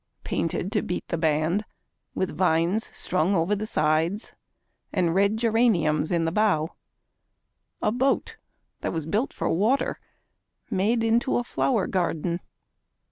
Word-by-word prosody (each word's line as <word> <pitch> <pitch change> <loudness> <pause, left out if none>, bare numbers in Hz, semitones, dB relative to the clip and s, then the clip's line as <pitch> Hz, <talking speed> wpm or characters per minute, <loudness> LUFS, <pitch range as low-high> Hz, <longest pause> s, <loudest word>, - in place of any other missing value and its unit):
Painted 175 +3 -2
to 210 -2 +1
beat 180 - -4
the 170 - -1
band, 160 +5 +1 0.5
with 185 - -2
vines 180 +4 +2
strung 185 +2 0
over 180 +4 +2
the 215 +2 -4
sides 160 +5 +1 0.6
And 175 -4 +1
red 200 +3 +3
geraniums 215 -10 +2
in 170 -2 +1
the 165 - 0
bow, 180 -6 +2 1.1
a 210 - +3
boat 270 - 0 0.4
that - - -3
was 160 -3 -3
built 210 - 0
for - - -3
water 220 +11 +1 0.7
Made 225 +5 +1
into 230 +3 +2
a 245 - 0
flower 240 -3 0
garden. 170 -2 -1
190 Hz, 135 wpm, -25 LUFS, 165-220 Hz, 1.1 s, red